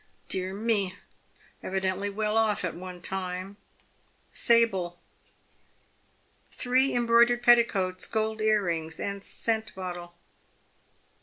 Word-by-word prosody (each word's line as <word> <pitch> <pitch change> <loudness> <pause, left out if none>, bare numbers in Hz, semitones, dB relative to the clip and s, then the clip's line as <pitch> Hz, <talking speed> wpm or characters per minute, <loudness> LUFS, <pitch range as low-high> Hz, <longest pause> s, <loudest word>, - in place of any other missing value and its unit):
Dear 185 0 -2
me! 205 -3 0 0.7
evidently 190 +1 -2
well 210 +1 -2
off 220 -4 +2
at 175 - -3
one 180 0 -9
time 185 +1 -3 0.4
— - - -36
sable! 195 -7 +4 0.8
* - - -38
Three 255 +2 +1
embroidered 240 0 +4
petticoats, 200 -7 +3
gold 220 0 -2
earrings, 175 -7 0
and 200 0 -3
scent 220 -1 -2
bottle.' 175 -2 -7
200 Hz, 100 wpm, -27 LUFS, 185-225 Hz, 0.8 s, sable